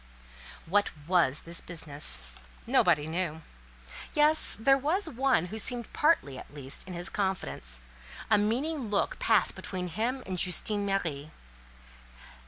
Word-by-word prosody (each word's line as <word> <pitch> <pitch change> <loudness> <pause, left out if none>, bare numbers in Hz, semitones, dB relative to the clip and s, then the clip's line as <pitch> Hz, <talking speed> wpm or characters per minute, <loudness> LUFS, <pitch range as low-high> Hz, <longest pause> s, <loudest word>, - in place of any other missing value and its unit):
What 205 +4 +2 0.2
was 170 -6 +2
this 170 0 -6
business? 145 - -4 0.3
Nobody 155 -4 +3
knew. 160 -1 -3 0.7
Yes, 300 +1 +4
there 270 +5 +5
was 315 +8 0
one 265 - +1
who 220 - -2
seemed 240 +1 0
partly, 220 - +2
at - - -12
least, 140 -2 -3
in 185 - -7
his 175 +1 +1
confidence; 185 - -3 0.5
a 210 -2 +4
meaning 250 +5 -1
look 205 - 0
passed 220 -5 +3
between 185 -1 -4
him 240 +9 -2
and 185 -1 -3
Justine 200 +4 +1
Marie. 160 -7 -2
190 Hz, 130 wpm, -29 LUFS, 160-235 Hz, 0.7 s, there